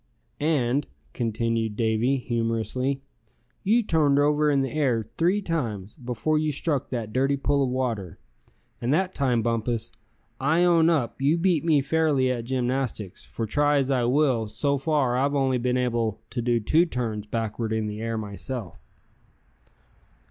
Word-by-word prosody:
"And," 145 -3 +1 0.3
continued 115 -1 -1
Davy, 115 +4 +1
humorously, 120 +2 -1 0.6
"you 230 +4 +3
turned 150 -7 +2
over 150 +1 +3
in 140 -2 +2
the 135 - -3
air 125 -8 0
three 185 +5 +1
times, 110 - -3
before 125 +4 -1
you 155 0 0
struck 145 -1 -2
that 115 -4 -4
dirty 135 +2 +2
pool 140 +1 +1
of 135 - +1
water. 120 -8 -2 0.6
And 120 +2 0
that 185 +2 0
time, 125 -5 +1
Bumpus, 115 0 -1 0.5
I 160 +6 +2
own 170 -2 +5
up 140 -6 0
you 145 +5 +3
beat 170 -3 +2
me 155 -4 +3
fairly 145 -3 +2
at 120 -2 -3
gymnastics; 125 -5 -2
for 115 - -5
try 145 +6 +2
as 135 -1 +1
I 125 -3 +2
will, 125 -3 +2
so 140 +7 -1
far 135 -4 +1
I've 140 +3 +1
only 130 -2 +1
been 125 +1 0
able 115 -4 0
to 120 - -2
do 120 0 +1
two 160 +10 +3
turns 110 -7 -3
backward 110 0 -3
in 110 -1 0
the 105 +1 -5
air, 115 0 -2
myself." 105 - -5
130 Hz, 155 wpm, -25 LUFS, 115-145 Hz, 0.6 s, own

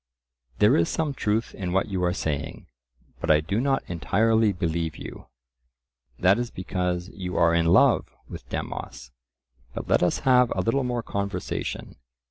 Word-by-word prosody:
"There 105 +1 +5
is 85 - +2
some 155 -3 -1
truth 110 -2 -1
in 90 -3 -4
what 95 +3 +1
you 95 -2 -2
are 90 - +2
saying, 80 -1 -4 0.5
but - - -4
I 75 -1 +6
do 100 +9 -1
not 135 0 +1
entirely 110 +5 +2
believe 85 -4 -2
you." - - -9 0.9
That 95 +5 +4
is 120 -1 -2
because 90 -2 -3
you 90 -4 -5
are 85 0 +4
in 85 -1 +2
love 85 - +4 0.2
with - - -10
Demos. - - -6 0.6
But - - -5
let - - +3
us 90 - +1
have 125 -2 +4
a - - 0
little 130 +4 +1
more 120 -2 -2
conversation. 100 0 -4
95 Hz, 160 wpm, -25 LUFS, 85-115 Hz, 0.9 s, I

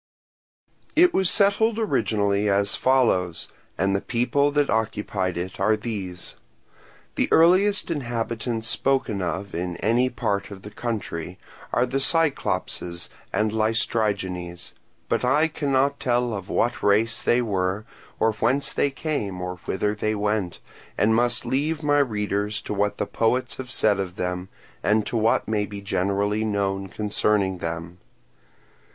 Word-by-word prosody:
It 355 +2 +6
was 190 -2 +3
settled 215 +2 +3
originally 105 - +1
as 100 0 +1
follows, 110 -10 +2 0.3
and 95 0 +1
the 100 - 0
peoples 140 +4 +1
that 145 -1 +3
occupied 105 -4 -1
it 90 +1 -5
are 105 +3 +3
these. 100 -6 -5 0.8
The - - 0
earliest 185 +4 +4
inhabitants 115 -4 -2
spoken 110 -2 0
of 95 +2 -3
in 85 0 -3
any 120 +4 +2
part 100 -4 -2
of 95 -2 -10
the 105 - -9
country 100 -7 -4 0.3
are 120 - +2
the 135 +2 -1
Cyclopes 160 +1 +1
and 90 +5 -3
Laestrygones; 100 -5 -1 0.3
but - - 0
I 145 +6 +3
cannot 140 -2 0
tell 120 -1 +1
of 100 -3 -6
what 120 +1 0
race 110 +3 +2
they 120 - +3
were, 95 -1 -1 0.3
or 110 0 +3
whence 125 +6 +1
they 145 - +2
came 135 - -3
or 90 0 -4
whither 105 +2 0
they 110 +1 -1
went, 105 -3 -1 0.4
and 110 +2 +3
must 120 +1 +2
leave 150 +4 -1
my 145 0 +3
readers 105 -4 0
to - - -4
what 105 0 0
the - - -1
poets 125 +3 0
have 130 -1 -7
said 105 -5 +2
of 90 -2 -3
them 90 +1 -3 0.3
and 105 0 +2
to - - -4
what 115 0 +2
may 105 -2 0
be 100 -1 -7
generally 100 +2 0
known 100 -2 -1
concerning 100 -2 0
them. 85 +1 -5
110 Hz, 145 wpm, -24 LUFS, 100-125 Hz, 0.8 s, It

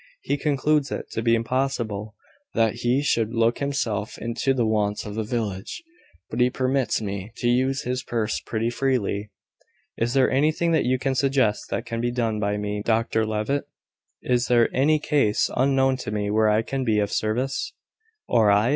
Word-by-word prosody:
He - - 0
concludes 145 0 +1
it - - -5
to 115 - -2
be 115 0 +3
impossible 115 -4 -2 0.4
that 115 0 +2
he 125 +4 +1
should 115 -4 0
look 115 +1 +2
himself 120 -7 -2
into 115 +3 -1
the 125 -3 +1
wants 105 -2 0
of 105 - -6
the 110 - -2
village; 110 - -4 0.5
but 115 - -3
he 125 - +5
permits 130 -2 0
me 100 +1 -5
to 120 - -2
use 130 +2 +1
his 125 +1 -2
purse 115 -3 -2
pretty 115 +1 -2
freely. 115 -6 -1 0.7
Is 120 +2 -1
there 130 -1 +4
anything 155 +4 +2
that 160 -5 +2
you 130 +1 +2
can 135 +1 -1
suggest 130 -5 +1
that 115 - -3
can 115 -1 -3
be 120 - 0
done 115 -3 -1
by 105 0 0
me, 105 0 -3
Dr 110 -1 +1
Levitt? 110 +7 -1 0.6
Is 125 -2 +1
there 120 -1 +3
any 145 +4 +4
case 145 -8 +1
unknown 135 0 +3
to 125 - -6
me 105 -1 -2
where 110 0 +3
I 105 +1 +2
can 135 +2 -3
be 110 -4 +1
of 105 -1 0
service?" 125 +5 -1 0.6
"Or 110 -3 +4
I?" 105 +3 +4
120 Hz, 180 wpm, -24 LUFS, 110-130 Hz, 0.7 s, he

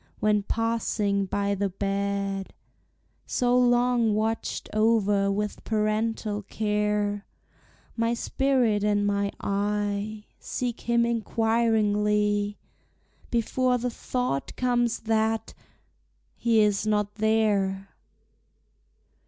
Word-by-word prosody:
When 210 -1 +2
passing 210 -2 0
by 200 +1 0
the 200 0 -1
bed, 195 0 -2 0.7
So 245 -1 +1
long 245 -2 +3
watched 220 +1 -2
over 210 -2 +2
with 210 +1 -3
parental 215 -1 -1
care, 210 0 -1 0.7
My 230 0 +1
spirit 245 -5 +1
and 205 -1 +2
my 200 0 0
eye 205 +1 -2
Seek 245 -2 -4
him 235 0 +4
inquiringly, 210 -3 +1 0.7
Before 250 +2 +1
the 245 +1 -2
thought 245 - -3
comes, 240 -2 +1
that 220 0 0 0.8
he 230 -2 +3
is 210 0 +1
not 210 -1 +1
there! 205 -3 +1
210 Hz, 90 wpm, -26 LUFS, 205-230 Hz, 0.8 s, him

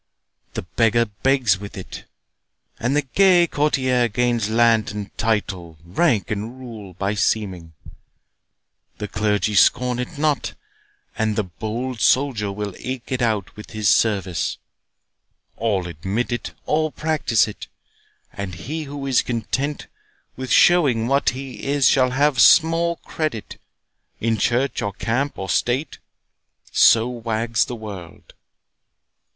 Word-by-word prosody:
The - - -3
beggar 115 +4 +2
begs 110 -2 +1
with 100 -1 -9
it, 95 - -8 0.7
and 125 +5 0
the 150 - +2
gay 180 +5 +4
courtier 130 -6 +1
Gains 120 -1 0
land 115 -1 +3
and 105 -1 -7
title, 95 -7 -2
rank 105 - +1
and 110 +5 -4
rule, 110 -7 -10
by 100 +2 -1
seeming; 95 -6 -1 1.2
The 105 - -4
clergy 105 0 0
scorn 125 +4 +3
it 125 +5 -5
not, 150 -1 0 0.6
and 110 -1 0
the 110 - +1
bold 110 +6 -5
soldier 125 -7 +2
Will 100 -1 -5
eke 130 -1 -6
with 130 -1 -1 0.4
it 105 - -11
his 105 -2 +1
service.—All 95 +1 -2
admit 95 +9 -3
it, 120 -3 -4
All 155 +1 +1
practise 150 -10 +1
it; 105 - -9 0.7
and 100 -2 -5
he 155 - -5
who 140 0 -6
is 135 -3 +3
content 130 +5 -3 0.5
With 130 0 -6
showing 140 -11 +4
what 140 +2 +2
he 130 +1 -7
is, 140 -1 +3
shall 130 -2 +4
have 135 -1 +2
small 165 +6 +5
credit 155 -9 -4 0.6
In 115 0 0
church, 125 +5 0
or 100 - -2
camp, 130 +8 -2
or 95 - -5
state—So 120 - 0
wags 115 -1 -1
the 125 - -6
world. 100 -7 -10
115 Hz, 125 wpm, -21 LUFS, 105-135 Hz, 1.2 s, small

